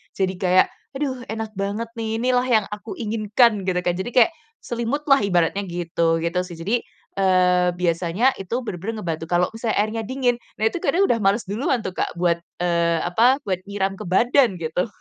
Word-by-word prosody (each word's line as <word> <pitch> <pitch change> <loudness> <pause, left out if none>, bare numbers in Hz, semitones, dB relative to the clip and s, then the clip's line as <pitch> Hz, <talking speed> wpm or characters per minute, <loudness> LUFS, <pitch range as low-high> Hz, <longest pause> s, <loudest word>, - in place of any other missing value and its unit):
jadi 190 -1 0
kayak 185 -1 +4 0.3
aduh 260 -3 -3
enak 220 0 -4
banget 205 +4 -2
nih 220 0 -2
inilah 250 0 +2
yang 220 -5 +3
aku 210 +2 -6
inginkan 215 -1 +2
gitu 185 - +1
kan, 175 - +2
jadi 215 - -3
kayak 295 +7 +6 0.3
selimut 240 +5 -2
lah 275 - +7
ibaratnya 180 -1 +1
gitu, 170 -1 0
gitu 170 +2 0
sih. 170 - -9
Jadi, 180 +8 -1 0.4
eee, 180 -1 +3
biasanya 175 +7 +1
itu 195 +4 -4
bener-bener 215 +2 -5
ngebantu, 165 -1 -3
kalau 175 +1 +2
misalnya 225 0 -2
airnya 220 +1 -2
dingin 255 -2 +1 0.2
nah 215 - -5
itu 350 - -4
kadang 380 +3 +2
udah 235 -12 +2
males 200 +3 +2
duluan 225 +4 -1
tuh 185 - -3
Kak 180 - -3
buat, 170 -1 +1 0.2
eee, 170 -1 +2
apa, 240 +10 +3
buat 185 -3 -1
nyiram 195 -1 -2
ke - - -6
badan 235 +3 +3
gitu, 165 +6 -1
200 Hz, 185 wpm, -22 LUFS, 180-235 Hz, 0.4 s, lah